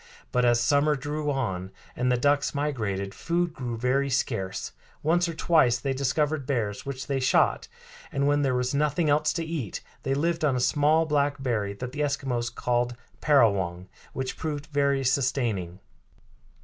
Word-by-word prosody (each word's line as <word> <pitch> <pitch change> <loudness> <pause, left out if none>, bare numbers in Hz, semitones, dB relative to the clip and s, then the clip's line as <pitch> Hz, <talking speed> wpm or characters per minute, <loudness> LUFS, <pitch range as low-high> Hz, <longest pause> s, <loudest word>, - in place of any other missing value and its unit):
But 125 0 +2
as 120 -1 +4
summer 145 +5 +3
drew 150 +2 -3
on, 95 -10 -2 0.3
and 125 +1 +1
the 125 - +3
ducks 145 +3 +1
migrated, 105 -10 -2
food 175 0 -1
grew 120 -5 -4
very 130 +4 +1
scarce. 115 -7 -2 0.3
Once 170 +3 +2
or 165 - -5
twice 155 -7 +3
they 135 +2 -2
discovered 140 +2 0
bears, 110 -5 -2
which 135 -1 -4
they 140 -1 -1
shot, 130 -1 +2 0.4
and 140 0 0
when 145 0 +3
there 135 -3 +1
was 125 +1 0
nothing 150 +2 +1
else 150 +1 +3
to 165 -1 -2
eat 155 - -4 0.2
they 135 - -1
lived 165 +3 0
on 140 -4 +3
a - - 0
small 150 +5 +3
black 145 -2 +1
berry 105 -6 -1
that 125 +5 -6
the 145 - -7
Eskimos 135 -4 -1
called 120 0 -1 0.3
parawong, 95 - +2 0.2
which 130 -1 -4
proved 150 -2 -4
very 140 -1 +2
sustaining. 120 -9 0
135 Hz, 165 wpm, -26 LUFS, 120-145 Hz, 0.4 s, as